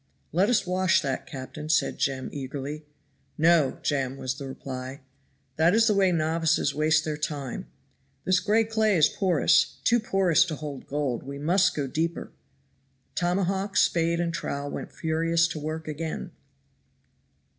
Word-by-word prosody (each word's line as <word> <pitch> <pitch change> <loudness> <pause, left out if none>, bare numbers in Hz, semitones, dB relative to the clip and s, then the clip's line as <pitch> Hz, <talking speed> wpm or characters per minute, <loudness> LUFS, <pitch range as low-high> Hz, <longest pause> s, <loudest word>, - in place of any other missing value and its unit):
"Let 185 +7 +2
us 240 -5 +2
wash 185 0 +2
that, 135 -2 -3
captain," 145 +3 -7
said 155 - +1
Jem 130 -1 -1
eagerly. 145 +2 -6 0.5
"No! 160 -3 +3
Jem," 135 -2 -1
was 130 -1 -2
the 140 0 -7
reply; 130 0 -7 0.6
"that 165 +5 +4
is 225 0 +5
the 220 - +3
way 195 -2 +3
novices 160 -2 +1
waste 155 +2 +2
their 155 -1 -2
time. 145 -4 -4 0.6
This 185 0 +3
gray 220 +2 +2
clay 220 -3 +1
is 155 - +6
porous, 180 -6 +2
too 240 +1 +4
porous 195 -7 +3
to 165 -3 -4
hold 145 -3 -7
gold 140 -4 -2
we 140 +1 -7
must 180 +6 +2
go 145 - -1
deeper." 160 +5 -3 0.8
Tomahawk, 190 +2 0
spade 170 0 +2
and 170 -1 -1
trowel 145 -3 -4
went - - -6
furiously 165 +1 +1
to 155 -2 -6
work 155 +1 -4
again. 155 +1 -4
160 Hz, 150 wpm, -26 LUFS, 145-180 Hz, 0.8 s, is